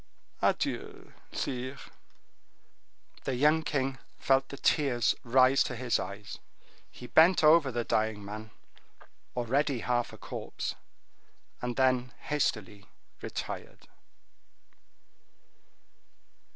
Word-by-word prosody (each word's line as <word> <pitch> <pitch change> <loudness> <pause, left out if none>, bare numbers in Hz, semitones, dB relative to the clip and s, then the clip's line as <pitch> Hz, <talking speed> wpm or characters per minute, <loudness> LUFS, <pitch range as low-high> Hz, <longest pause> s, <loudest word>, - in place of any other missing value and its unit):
Adieu, - - -1 0.2
sire!" 130 +1 -3 1.5
The 135 - -1
young 150 +5 +4
king 135 -3 -2 0.2
felt 135 0 +2
the 140 - -7
tears 130 -7 +2
rise 130 +2 +5
to 125 - -4
his 120 0 0
eyes; 100 +1 -7 0.5
he 125 - -11
bent 165 +6 +5
over 155 -3 +6
the 120 0 -1
dying 110 -2 0
man, 110 +2 -7 0.9
already 130 +2 0
half 120 -1 0
a - - -11
corpse, - - -5 0.9
and 125 -1 -3
then 130 -2 +2
hastily 105 -8 -2 0.3
retired. - - -6
130 Hz, 95 wpm, -30 LUFS, 115-140 Hz, 1.5 s, over